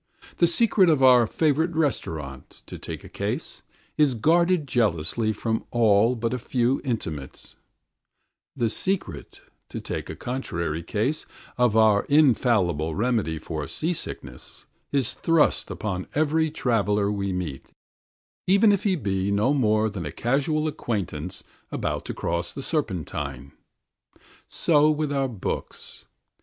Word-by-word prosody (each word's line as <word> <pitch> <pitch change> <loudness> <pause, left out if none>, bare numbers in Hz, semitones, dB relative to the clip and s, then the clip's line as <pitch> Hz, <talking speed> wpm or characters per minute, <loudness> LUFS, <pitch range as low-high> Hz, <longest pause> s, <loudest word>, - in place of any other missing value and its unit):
The 170 - +5
secret 190 0 +4
of 150 -4 +3
our 125 -3 +7
favourite 160 +5 +1
restaurant, 80 - -3
to - - -9
take - - -7
a - - -10
case, - - -4 0.4
is 145 -4 +3
guarded 170 +5 +2
jealously 110 - +1
from 110 +1 -2
all 115 0 +3
but 115 +1 -2
a 125 - -2
few 125 +2 0
intimates; 80 - -5 1.0
the 120 -4 +1
secret, 190 - -3 0.3
to - - -5
take - - -5
a - - -5
contrary 85 - -3
case, 115 - -2 0.3
of 120 -3 +2
our 110 -2 +4
infallible 110 - +3
remedy 110 -7 0
for 80 -2 -5
seasickness 165 +1 -4 0.3
is 135 -5 0
thrust 165 -2 +2
upon 95 -4 -4
every 155 +1 +2
traveller 105 -8 +1
we 100 -1 -2
meet, 85 -7 -5 0.8
even 200 +3 +5
if 200 -1 +1
he 195 -2 +3
be 100 - -1
no 105 +7 +2
more 110 -5 +2
than 95 -7 -5
a - - -5
casual 145 - 0
acquaintance 95 - -4 0.3
about - - -3
to - - -4
cross 85 +1 -2
the 140 - -7
Serpentine. 75 - -3 1.0
So 150 -2 +3
with 150 -1 0
our 135 -1 +1
books. 110 -6 -5
115 Hz, 130 wpm, -25 LUFS, 95-150 Hz, 1.0 s, our